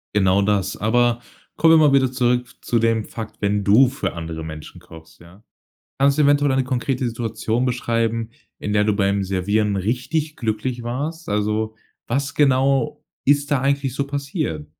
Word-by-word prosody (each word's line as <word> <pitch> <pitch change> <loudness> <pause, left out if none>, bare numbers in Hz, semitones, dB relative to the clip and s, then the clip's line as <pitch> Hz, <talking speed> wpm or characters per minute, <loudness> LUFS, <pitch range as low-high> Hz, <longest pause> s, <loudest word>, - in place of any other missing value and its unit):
Genau, 95 0 +3
das 100 -2 0
aber 120 +2 +1 0.3
kommen 165 +1 +5
wir 150 - +6
mal 140 - +3
wieder 130 -2 +3
zurück 125 -1 +1
zu 120 - 0
dem 115 -1 +1
Fakt, 110 -2 -8
wenn 100 0 0
du 120 +6 +5
für 135 - -4
andere 80 -1 -6
Menschen 80 -1 -9
kochst, 80 0 -15
ja? 90 +5 -17 0.6
Kannst 140 +1 +3
du 150 - +4
eventuell 145 -1 +3
eine 130 0 +2
konkrete 130 0 -1
Situation 115 +1 -2
beschreiben, 115 -2 -1 0.3
in 105 - -3
der 105 0 +3
du 105 -1 +1
beim 100 -1 +1
Servieren 100 +2 0
richtig 130 - -2
glücklich 120 +2 -3
warst? 150 +7 -4
Also, 105 +1 -1 0.3
was 140 +3 -1
genau 135 -2 +2 0.2
ist 145 +1 +2
da 135 -3 +2
eigentlich 135 -2 0
so 140 - -1
passiert? 140 - -3
120 Hz, 165 wpm, -21 LUFS, 105-135 Hz, 0.6 s, wir